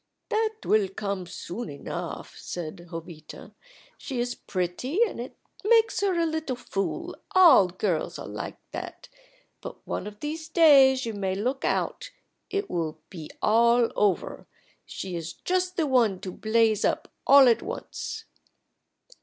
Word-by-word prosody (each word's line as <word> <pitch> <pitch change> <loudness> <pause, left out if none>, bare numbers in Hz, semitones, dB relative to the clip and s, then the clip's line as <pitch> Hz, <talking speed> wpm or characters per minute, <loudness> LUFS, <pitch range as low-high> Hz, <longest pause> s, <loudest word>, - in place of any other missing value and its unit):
"That 440 0 0
will 210 -2 +3
come 195 -2 -4
soon 180 +4 -6
enough," 140 - -6
said 175 0 -7
Jovita. 165 -2 -9 0.5
"She 260 -3 -4
is 245 0 -1
pretty, 185 - -3
and 445 - -2
it 245 +2 -7 0.3
makes 450 +1 +3
her 385 -3 +1
a 335 - +2
little 315 -5 -2
fool 195 -5 -4 0.2
all 325 - +8
girls 180 -2 -2
are - - -7
like - - -6
that; - - -7 0.5
but - - -9
one - - -4
of 210 0 -10
these 315 +3 -5
days 275 -6 +6
you 225 - -3
may 190 -2 -2
look 255 +7 -2
out - - -1 0.4
it 400 0 -2
will 165 - -3
be 165 -5 -8
all 235 +2 +4
over. 205 -3 0 0.4
She 185 -2 -6
is 165 0 -5
just 365 0 -1
the 325 - +2
one 235 -9 +2
to 185 - -5
blaze 220 +1 +2
up - - -1
all 275 -1 +8
at 235 - +4
once." - - -6
230 Hz, 145 wpm, -26 LUFS, 185-310 Hz, 0.5 s, all